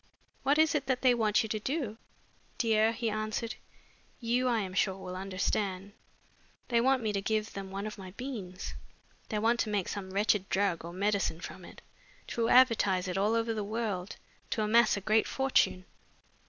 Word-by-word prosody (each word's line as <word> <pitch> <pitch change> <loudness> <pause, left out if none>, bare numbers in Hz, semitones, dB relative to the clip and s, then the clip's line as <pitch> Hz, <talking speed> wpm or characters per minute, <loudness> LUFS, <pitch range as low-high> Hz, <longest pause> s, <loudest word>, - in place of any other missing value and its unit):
"What 280 +2 +2
is 315 0 +4
it 290 -2 -1
that 260 -1 0
they 255 -1 +6
want 220 0 +2
you 220 - -5
to 215 - -1
do?" 255 -2 -3 0.6
"Dear," 220 -1 +3
he 230 -1 -2
answered, 215 +1 -2 0.7
"you, 245 +2 +1
I 240 -2 +2
am 190 -2 -5
sure, 190 0 +1
will 185 -1 -7
understand. 195 +1 -2 0.8
They 235 -2 +3
want 260 0 +3
me 215 -1 0
to 200 - -1
give 215 +1 -1
them 195 -1 -6
one 195 +2 -4
of 215 -1 -6
my 190 -1 -8
beans. 215 -9 -6 0.6
They 215 - -1
want 230 +3 +2
to 220 - 0
make 205 -3 0
some 195 -2 -5
wretched 200 0 +1
drug 190 -4 +1
or 170 - -7
medicine 195 -2 0
from 185 +2 -8
it, - - -13 0.5
to 230 -1 0
advertise 215 -7 +4
it 180 - -3
all 205 +4 +2
over 230 0 0
the 215 -2 -2
world, 210 -3 -3 0.3
to 215 - 0
amass 215 0 +4
a - - -4
great 215 +3 +2
fortune." 265 -8 +1
215 Hz, 185 wpm, -30 LUFS, 195-235 Hz, 0.8 s, they